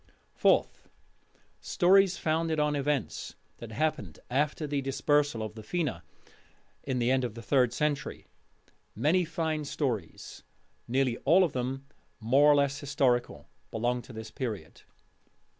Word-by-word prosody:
Fourth: - - +1 0.7
Stories 190 +1 +3
founded 160 0 0
on 150 0 +1
events 140 -3 -2 0.2
that 115 -2 -9
happened 110 - -2
after 150 +3 0
the 145 -1 -1
dispersal 135 -2 +1
of 110 -1 -6
the 110 - -9
Fena 135 - -2 0.8
(in 130 -2 -3
the 120 +1 +1
end 130 -1 +2
of 120 -3 -4
the 115 - -8
third 125 0 +3
century). 145 +3 -2 0.7
Many 155 - +2
fine 160 -1 -2
stories 125 - -4 0.5
nearly 130 -1 +1
all 175 +7 +4
of 170 - -1
them 130 +2 -3 0.3
more 135 +6 +5
or - - +6
less 140 0 +1
historical 125 - 0 0.2
belong 120 +2 -1
to 130 - -13
this 110 -1 -8
Period. 105 - -5
135 Hz, 135 wpm, -29 LUFS, 120-150 Hz, 0.8 s, or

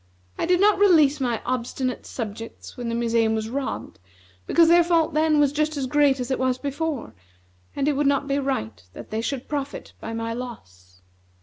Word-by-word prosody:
I - - -2
did 360 0 +3
not 410 0 +4
release 310 -8 +5
my 240 -4 -1
obstinate 255 +1 -3
subjects 225 -1 -7
when 240 -1 -4
the 230 - -2
museum 230 -1 +1
was 220 +1 -3
robbed, 275 +1 -4 0.5
because 335 -1 +5
their 345 +1 +6
fault 335 -2 +2
then 310 0 +3
was 290 -1 +3
just 305 0 0
as 275 - -1
great 285 0 +3
as 250 +1 -3
it 260 - 0
was 255 -1 +1
before; 280 - -3 0.6
and 280 0 0
it 300 - +3
would 285 +1 +1
not 280 0 +1
be 280 0 +1
right 110 - -3
that - - -11
they 220 +1 -1
should 250 +2 -4
profit 285 -1 -5
by 225 - -5
my 230 0 -3
loss." 90 - -10
270 Hz, 195 wpm, -24 LUFS, 230-295 Hz, 0.6 s, their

